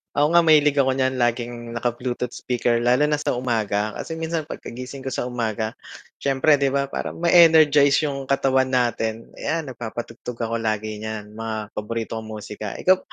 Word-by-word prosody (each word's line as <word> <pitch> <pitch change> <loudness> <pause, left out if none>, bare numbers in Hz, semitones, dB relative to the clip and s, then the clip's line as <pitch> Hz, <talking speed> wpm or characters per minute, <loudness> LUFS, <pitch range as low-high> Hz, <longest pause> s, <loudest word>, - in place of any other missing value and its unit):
Ako 145 +1 +4
nga 170 - +7
mahilig 150 -2 +5
ako 135 -2 +3
niyan 130 0 0
laging 120 -1 -1
naka-bluetooth 120 +1 -3
speaker, 120 -1 0
lalo 125 +5 +3
na 150 - +2
sa 150 - -1
umaga 110 -4 -1
kasi - - -6
minsan 165 0 -2
pagkagising 130 -2 -8
ko 135 - -8
sa 130 - -2
umaga, 115 -3 -2 0.5
siyempre 140 +2 +3
'di 140 - +2
ba 140 +1 +1
parang - - -4
ma-energize 155 -4 +5
yung 140 -2 -3
katawan 135 -1 +2
natin, 115 -3 -1
ayan, 165 0 -1
nagpapatugtog 120 0 -7
ako 115 0 -2
lagi 110 -1 -2
niyan 110 -1 -6
mga 110 -1 -5
paborito 115 +1 -4
kong 110 - -9
musika. 105 -1 -7
Ikaw 185 0 +6
125 Hz, 165 wpm, -23 LUFS, 115-140 Hz, 0.5 s, nga